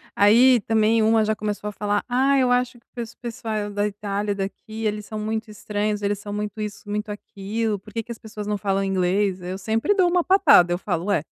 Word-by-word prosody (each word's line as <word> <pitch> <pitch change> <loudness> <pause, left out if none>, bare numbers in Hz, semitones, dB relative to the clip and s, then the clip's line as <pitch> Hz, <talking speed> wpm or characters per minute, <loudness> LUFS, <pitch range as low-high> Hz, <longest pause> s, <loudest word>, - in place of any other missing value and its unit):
aí 240 +5 +6
também 220 +1 +2
uma 220 0 +4
já 215 0 0
começou 210 0 -4
a - - -6
falar: 205 0 -1
"Ah, 270 +3 +3
eu 250 -1 +3
acho 245 -1 +1
que - - -39
o - - -72
pes 235 -1 -5
o - - -46
pessoal 220 -3 -4
da 205 0 0
Itália, 205 0 -2
daqui 215 +3 -5
eles 210 -1 -2
são 215 -1 -6
muito 220 +1 -3
estranhos. 210 0 -2
Eles 205 0 -1
são 205 0 -7
muito 210 0 -4
isso, 205 0 -6
muito 210 +1 -3
aquilo. 205 +1 -3
Por 210 +1 -15
que 230 - -1
que 235 - -10
as 230 - -6
pessoas 210 -1 -8
não 210 -1 0
falam 195 -1 0
inglês?". 190 0 0
Eu 185 +2 -5
sempre 225 - +1
dou 370 -3 +3
uma 350 -1 +2
patada. 370 - +5
Eu - - 0
falo: 180 -2 -3
"Ué, 200 -7 +1
210 Hz, 235 wpm, -23 LUFS, 205-225 Hz, -, aí